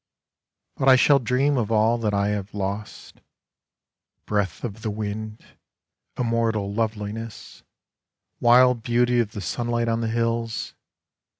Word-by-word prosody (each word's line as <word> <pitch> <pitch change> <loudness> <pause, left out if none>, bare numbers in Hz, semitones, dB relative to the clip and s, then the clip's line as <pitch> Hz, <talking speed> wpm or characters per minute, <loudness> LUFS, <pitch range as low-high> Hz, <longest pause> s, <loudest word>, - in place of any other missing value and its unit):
But 135 - +3
I 130 - +9
shall 140 +2 +5
dream 130 +3 +1
of 115 -3 -1
all 110 +2 +3
that 110 -2 0
I 100 0 +1
have 105 0 -4
lost 100 +1 -5 0.5
— - - -59
Breath 100 -5 -2
of 110 -2 -5
the 110 - -2
wind, 105 +1 -5 0.7
immortal 115 -4 0
loveliness, 110 0 -4 0.8
Wild 125 0 +5
beauty 120 +1 +2
of 110 -2 -1
the 105 - -5
sunlight 120 +4 -2
on 115 0 0
the 115 - -1
hills. 115 0 -2
115 Hz, 130 wpm, -24 LUFS, 105-120 Hz, 0.8 s, I